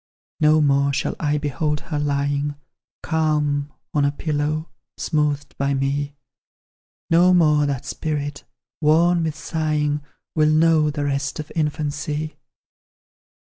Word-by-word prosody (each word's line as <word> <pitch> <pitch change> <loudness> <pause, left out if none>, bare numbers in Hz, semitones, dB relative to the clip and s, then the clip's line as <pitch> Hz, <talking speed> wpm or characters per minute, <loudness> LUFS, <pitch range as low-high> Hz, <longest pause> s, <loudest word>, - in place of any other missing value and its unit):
No 155 0 +5
more 140 -1 +3
shall 140 +1 -1
I 150 -1 +1
behold 150 +1 -1
her 150 -3 -3
lying 145 0 0 0.5
Calm 150 -3 0 0.2
on 145 - +2
a 140 - +3
pillow, 150 +1 -2 0.3
smoothed 145 -3 -1
by 140 0 +1
me; 140 +1 -1 1.0
No 180 +2 +6
more 150 -4 +4
that 135 -3 -3
spirit, 145 -2 -3 0.4
worn 165 +3 +4
with 160 -2 -2
sighing, 150 -2 -1 0.3
Will 155 -1 +3
know 155 0 +4
the 145 -1 -3
rest 140 +2 -2
of 155 +1 -6
infancy. 150 0 -2
150 Hz, 120 wpm, -22 LUFS, 145-155 Hz, 1.0 s, No